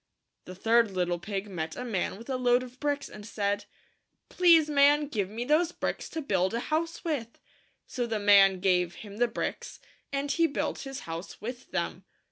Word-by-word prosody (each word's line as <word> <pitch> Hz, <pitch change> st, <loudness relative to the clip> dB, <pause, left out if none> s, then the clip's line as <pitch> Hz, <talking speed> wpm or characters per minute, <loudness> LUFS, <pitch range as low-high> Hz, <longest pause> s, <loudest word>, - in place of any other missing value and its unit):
The 185 Hz, -, -9 dB
third 230 Hz, +3 st, +3 dB
little 180 Hz, -2 st, -1 dB
pig 195 Hz, +2 st, -4 dB
met 160 Hz, -5 st, -4 dB
a 250 Hz, -, -5 dB
man 195 Hz, -5 st, -2 dB
with 230 Hz, -, -12 dB
a 265 Hz, -, -1 dB
load 250 Hz, 0 st, +3 dB
of 255 Hz, 0 st, -12 dB
bricks, 285 Hz, -1 st, -1 dB
and 210 Hz, -, -11 dB
said, 205 Hz, -1 st, -2 dB, 0.3 s
" -, -, -50 dB
Please, 335 Hz, -4 st, +5 dB
man, 290 Hz, 0 st, +4 dB
give 210 Hz, -9 st, -2 dB
me 230 Hz, +3 st, -4 dB
those 320 Hz, +5 st, +3 dB
bricks -, -, -4 dB
to 320 Hz, -, -4 dB
build 190 Hz, -4 st, +1 dB
a -, -, 0 dB
house 325 Hz, +5 st, -2 dB
with 260 Hz, -8 st, -3 dB, 0.5 s
so 245 Hz, -2 st, -3 dB
the 225 Hz, -1 st, -1 dB
man 200 Hz, -2 st, +5 dB
gave 180 Hz, -2 st, +2 dB
him 205 Hz, 0 st, -10 dB
the 245 Hz, +1 st, +3 dB
bricks, -, -, -5 dB, 0.3 s
and 280 Hz, +1 st, -1 dB
he 335 Hz, -1 st, +3 dB
built 285 Hz, -, -2 dB
his 270 Hz, 0 st, -6 dB
house 165 Hz, +2 st, -7 dB
with 245 Hz, +3 st, -7 dB
them. 180 Hz, 0 st, -3 dB
230 Hz, 195 wpm, -28 LUFS, 195-280 Hz, 0.5 s, Please